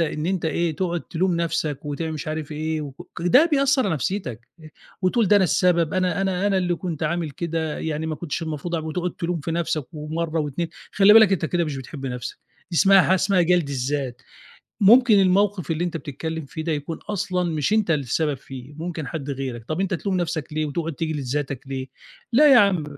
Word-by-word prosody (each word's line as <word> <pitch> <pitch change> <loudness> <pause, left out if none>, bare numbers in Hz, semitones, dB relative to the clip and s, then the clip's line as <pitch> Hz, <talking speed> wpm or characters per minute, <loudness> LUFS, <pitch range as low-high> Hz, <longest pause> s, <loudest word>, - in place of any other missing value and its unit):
إن 155 -1 -1
أنت 185 -2 -1
إيه 160 0 0
تقعد 175 -2 -1
تلوم 180 +3 -1
نَفْسك 160 -4 -1
وتعم 155 +2 -3
مش 155 0 -5
عارف 155 0 -4
إيه 155 +1 -2
وك 140 -2 -9
ده 255 - +6
بيأثّر 275 -1 +3
على 185 - +1
نَفْسيتك 130 - -4
آآ 155 -1 -13 0.3
وتقول 200 +3 +2
ده 205 - +6
أنا 195 - +4
السبب، 170 -3 +2
أنا 185 -1 +1
أنا 190 0 0
أنا 200 -1 +2
اللي 180 -1 0
كنت 170 -3 -5
عامل 165 0 -1
كده 160 +1 -3
يعني 160 0 -3
ما 160 - -2
كنتش 155 +1 -4
المفروض 160 +2 -4
أع 165 - 0
وتقعد 170 +3 -3
تلوم 170 -1 -3
في 155 - -4
نَفْسك 160 -4 -1
ومرّة 160 +2 -2
و2، 150 +3 -3 0.2
خلّي 205 +1 +6
بالك 220 -3 +7
أنت 180 -4 0
كده 170 +2 0
مش 150 -3 -4
بتحب 135 +1 -7
نَفْسـك 125 -1 -5 0.3
دي 170 - -3
اسمها 195 +1 +6
حاجة 185 - +3
اسمها 190 0 +2
جَلْد 175 -3 +2
الذات، 130 -1 -3 0.6
ممكن 220 +1 +7
الموقِف 195 -1 +2
اللي 165 +2 0
أنت 175 -2 -3
بتتكلِّم 160 +1 -5
فيه 160 +3 -6
ده 165 - 0
يكون 150 +2 -4
أصلًا 190 -3 -1
مش 155 +4 -1
أنت 215 -5 +2
السبب 150 +1 0
فيه 135 +1 -10
ممكن 160 -1 -5
حد 145 -3 -5
غيرك، 130 -4 -5
طَب 155 +8 -3
أنت 190 -1 0
تلوم 190 +2 -2
نَفْسك 165 -4 -3
ليه 155 0 -1
وتقعد 165 +3 -3
تجلّد 155 0 -3
ذاتك 135 0 -2
ليه؟ 135 -1 -4 0.5
لأ 290 +4 +7
يا 255 - +8
عم 195 -7 +3
165 Hz, 205 wpm, -23 LUFS, 150-185 Hz, 0.6 s, يا